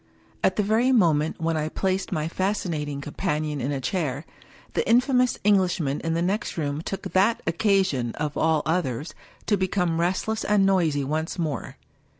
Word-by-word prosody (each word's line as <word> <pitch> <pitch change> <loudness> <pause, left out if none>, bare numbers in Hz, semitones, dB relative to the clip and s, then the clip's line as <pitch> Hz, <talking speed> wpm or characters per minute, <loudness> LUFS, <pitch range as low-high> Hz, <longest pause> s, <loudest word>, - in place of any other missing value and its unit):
At 185 - +3
the 210 - +1
very 225 +5 +2
moment 160 - +2
when 165 0 0
I 155 0 -1
placed 190 +3 -1
my 155 -3 -1
fascinating 165 -6 -2
com 145 - -8
panion 150 -5 -1
in 130 +3 -2
a 140 - -2
chair, 145 -2 -2 0.5
the - - -1
infamous 250 +1 +3
Englishman 180 -8 +2
in 165 0 -2
the 170 - 0
next 195 +2 -2
room 145 -1 -2
took 195 +3 -5
that 200 +5 +3
occasion, 175 - +1
of 150 0 -3
all 160 -2 +2
others, 155 -4 -1 0.3
to 205 - +2
become 180 -3 0
restless 190 +5 -1
and 205 -2 +3
noisy 165 -7 +2
once 155 +5 -2
more. 155 -6 -3
170 Hz, 165 wpm, -25 LUFS, 150-195 Hz, 0.5 s, At